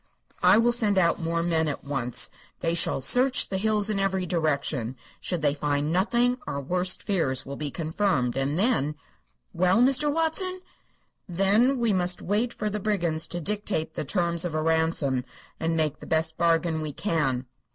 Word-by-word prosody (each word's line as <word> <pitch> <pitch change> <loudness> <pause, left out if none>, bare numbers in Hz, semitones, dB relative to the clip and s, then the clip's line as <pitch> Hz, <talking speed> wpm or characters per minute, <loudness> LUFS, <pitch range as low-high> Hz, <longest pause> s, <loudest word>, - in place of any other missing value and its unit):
"I - - +6
will 235 +1 +4
send 215 -4 +1
out 170 -2 +2
more 165 0 -1
men 165 -2 +1
at 145 - -4
once. 135 -4 0 0.3
They 165 - 0
shall 170 -5 +2
search 250 - +3
the 190 - -2
hills 215 0 +1
in 210 -2 -1
every 190 -1 0
direction. 140 -7 -1 0.2
Should 175 -4 -3
they 145 -1 +3
find 145 +1 -1
nothing 240 +7 +1
our 140 - -3
worst 180 +6 0
fears 135 -10 0
will 140 - -6
be 150 0 -4
confirmed, 155 -5 -1
and 135 +3 -1
then 185 - +1 0.3
" - - -46
"Well, 185 +4 +3
Mr. 275 +4 +3
Watson?" 345 +4 -1 0.7
"Then 205 +9 +2
we 235 -3 +1
must 180 -1 0
wait 215 +5 -1
for 215 - -4
the 210 0 -2
brigands 175 -6 -1
to 175 - -4
dictate 200 -3 -3
the - - -3
terms 170 +2 0
of 170 -3 -3
a 155 - 0
ransom, 160 -5 +1 0.4
and 165 0 -1
make 155 -2 -1
the - - -11
best 160 0 0
bargain 165 -1 +1
we 155 -2 -4
can." 135 -9 -1
170 Hz, 180 wpm, -26 LUFS, 150-205 Hz, 0.7 s, I